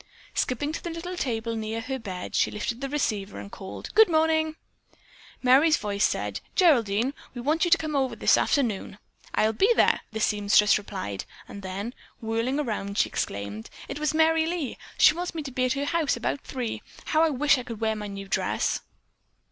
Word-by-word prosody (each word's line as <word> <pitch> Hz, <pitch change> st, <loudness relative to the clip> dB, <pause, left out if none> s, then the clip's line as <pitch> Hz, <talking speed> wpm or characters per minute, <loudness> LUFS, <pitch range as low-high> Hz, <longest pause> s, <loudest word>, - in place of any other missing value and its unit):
Skipping 290 Hz, +4 st, -1 dB
to 315 Hz, -, -6 dB
the 345 Hz, -, -3 dB
little 335 Hz, +2 st, -5 dB
table 230 Hz, -6 st, -2 dB
near 220 Hz, 0 st, -3 dB
her 260 Hz, +3 st, -4 dB
bed, 190 Hz, -5 st, -6 dB
she -, -, +3 dB
lifted 230 Hz, +4 st, -4 dB
the 275 Hz, -, -3 dB
receiver 210 Hz, -8 st, -2 dB
and 200 Hz, -, -9 dB
called, 190 Hz, -2 st, -8 dB
"Good 440 Hz, -2 st, +7 dB
morning." 315 Hz, -1 st, +2 dB, 0.9 s
Merry's 280 Hz, +5 st, +6 dB
voice 205 Hz, -1 st, -1 dB
said: -, -, 0 dB, 0.2 s
"Geraldine, 250 Hz, -, +3 dB, 0.2 s
we 245 Hz, -, -5 dB
want 310 Hz, +7 st, +2 dB
you -, -, 0 dB
to 345 Hz, -, +6 dB
come 310 Hz, -2 st, -3 dB
over 265 Hz, -2 st, +1 dB
this -, -, +4 dB
afternoon." 225 Hz, -8 st, 0 dB, 0.4 s
"I'll 220 Hz, +1 st, +3 dB
be 395 Hz, -, +3 dB
there!" -, -, +4 dB
the 220 Hz, -, -4 dB
seamstress 210 Hz, -1 st, +4 dB
replied, 185 Hz, -, -5 dB, 0.2 s
and 200 Hz, -, -9 dB
then, 195 Hz, +5 st, -5 dB, 0.3 s
whirling 230 Hz, +4 st, -1 dB
around, 210 Hz, -7 st, -3 dB
she -, -, +3 dB
exclaimed: 100 Hz, +2 st, -4 dB, 0.2 s
"It 285 Hz, -, -5 dB
was 305 Hz, -1 st, +1 dB
Merry 320 Hz, 0 st, +4 dB
Lee. 335 Hz, -6 st, -3 dB, 0.2 s
She -, -, +7 dB
wants 350 Hz, +1 st, -4 dB
me 315 Hz, -, -3 dB
to 275 Hz, -, -6 dB
be 255 Hz, 0 st, 0 dB
at 255 Hz, -, +1 dB
her 280 Hz, +1 st, -2 dB
house 315 Hz, -4 st, +1 dB
about 255 Hz, +4 st, -2 dB
three. 250 Hz, -4 st, -4 dB, 0.2 s
How 310 Hz, -, +2 dB
I 325 Hz, -, +5 dB
wish 290 Hz, 0 st, +3 dB
I -, -, -5 dB
could 230 Hz, -3 st, -7 dB
wear 220 Hz, -1 st, 0 dB
my 210 Hz, -1 st, -5 dB
new 195 Hz, -1 st, -7 dB
dress." 195 Hz, -, 0 dB
250 Hz, 195 wpm, -26 LUFS, 210-310 Hz, 0.9 s, Good